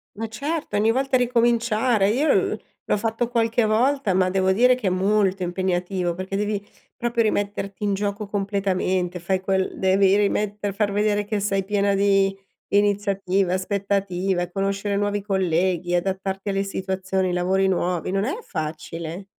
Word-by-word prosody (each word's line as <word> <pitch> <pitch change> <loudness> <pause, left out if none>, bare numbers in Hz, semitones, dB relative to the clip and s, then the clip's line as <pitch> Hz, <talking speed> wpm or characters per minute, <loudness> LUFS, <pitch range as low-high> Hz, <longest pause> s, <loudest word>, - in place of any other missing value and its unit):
Ma 225 +2 -4
certo, 285 +8 -4
ogni 215 +2 +3
volta 265 +2 0
ricominciare. 235 -3 +2
Io 270 +8 +2
u - - -4 0.3
l'ho - - +4
fatto 225 +3 -1
qualche 230 0 +1
volta 240 0 +2
ma 185 0 +2
devo 190 0 +2
dire 250 +5 +5
che 245 -6 -3
è - - +4
molto 195 0 +1
impegnativo 180 0 -1
perché 185 +2 -4
devi 205 -1 -2 0.3
proprio 235 0 0
rimetterti 205 -2 -2
in 205 -1 +1
gioco 205 +1 -2
completamente, 190 -3 -1
fai 185 +2 -1
quel 190 0 0
devi 190 +1 +3
rimette 205 0 0
far 200 0 -1
vedere 205 0 +1
che 205 0 -2
sei 195 -1 0
piena 200 0 +1
di 195 -1 +3 0.4
iniziativa, 200 -2 +1
aspettativa, 190 -2 -1
conoscere 195 +1 -1
nuovi 205 0 0
colleghi, 180 -2 0
adattarti 190 +2 -2
alle 195 0 0
situazioni, 190 -1 -2
i - - -1
lavori 190 +2 +1
nuovi, 180 -1 -1
non 195 +1 0
è 280 - -2
facile. 160 - -5
195 Hz, 150 wpm, -23 LUFS, 190-210 Hz, 0.4 s, dire